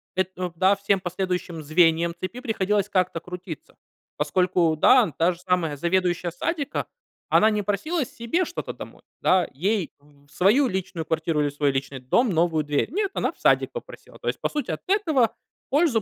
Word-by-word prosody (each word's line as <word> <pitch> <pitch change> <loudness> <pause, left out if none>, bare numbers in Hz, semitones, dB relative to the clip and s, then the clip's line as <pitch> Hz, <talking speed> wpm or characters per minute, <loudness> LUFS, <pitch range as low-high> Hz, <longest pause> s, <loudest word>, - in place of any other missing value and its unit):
это, 185 0 0
эм 175 -2 -3
да, 190 +4 +4
всем 200 0 +1
последующим 180 -2 -3
звеньям 165 +2 +3
цепи 185 +8 -5
приходилось 210 -3 0
как-то 185 -3 +1
крутиться, 180 -3 -9 0.4
поскольку, 170 +2 +2
да, 230 - +5
та 170 +2 +3
же 170 - -9
самая 180 -5 0
заведующая 175 +2 0
садика, 295 - -2 0.4
она 215 - +5
не 210 -1 0
просила 245 - -1
себе 235 +11 -1
что-то - - -5
домой, - - -11 0.2
да, 185 -2 +3
ей 190 +4 -1
в 145 0 -24
в - - -24
свою 220 +10 +4
личную 185 -5 -3
квартиру 160 -1 0
или 145 - +1
в - - -11
свой 145 -1 +1
личный 135 0 -3
дом 175 - +2
новую 165 -2 +2
дверь. 145 - -1
Нет, 395 +3 -1
она - - 0
в - - -29
садик - - +3
попросила. 485 - -10
То - - -8
есть - - -1
по - - +1
сути, 300 -1 -3
от - - -4
этого 315 - +2 0.3
пользу 285 -5 +3
185 Hz, 185 wpm, -24 LUFS, 165-220 Hz, 0.4 s, да